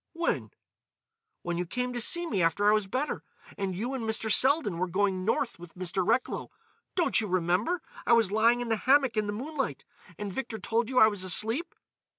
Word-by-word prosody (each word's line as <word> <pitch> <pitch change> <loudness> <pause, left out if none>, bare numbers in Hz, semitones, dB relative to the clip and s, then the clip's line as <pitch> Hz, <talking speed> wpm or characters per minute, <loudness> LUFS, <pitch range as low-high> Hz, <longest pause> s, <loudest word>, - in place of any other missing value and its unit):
"When?" 340 0 -1 0.9
"When 175 0 -2
you 180 - -2
came 250 +5 -2
to 240 - -3
see 345 +8 +1
me 210 - -1
after 170 +5 +2
I 210 - +6
was 210 -2 +1
better, 260 +9 -2 0.3
and 190 -2 -3
you 240 +8 -3
and 260 -3 -3
Mr. 220 0 -1
Selden 260 - +3
were 185 - 0
going 190 +1 0
North 230 -1 0
with 175 -1 -12
Mr. 185 +1 -1
Recklow. 230 +6 0 0.5
Don't 345 -9 +2
you 215 - -3
remember; 185 - 0 0.2
I - - +5
was 225 -4 +4
lying 230 +3 +3
in 240 - -4
the 225 - +1
hammock 265 +1 +3
in 215 -1 0
the - - -1
moonlight, 265 - -4 0.3
and 205 -2 -5
Victor 245 -2 -4
told 225 +3 -1
you 260 - -3
I 220 - +9
was 205 -3 -1
asleep?" 225 - 0
220 Hz, 200 wpm, -28 LUFS, 190-255 Hz, 0.9 s, I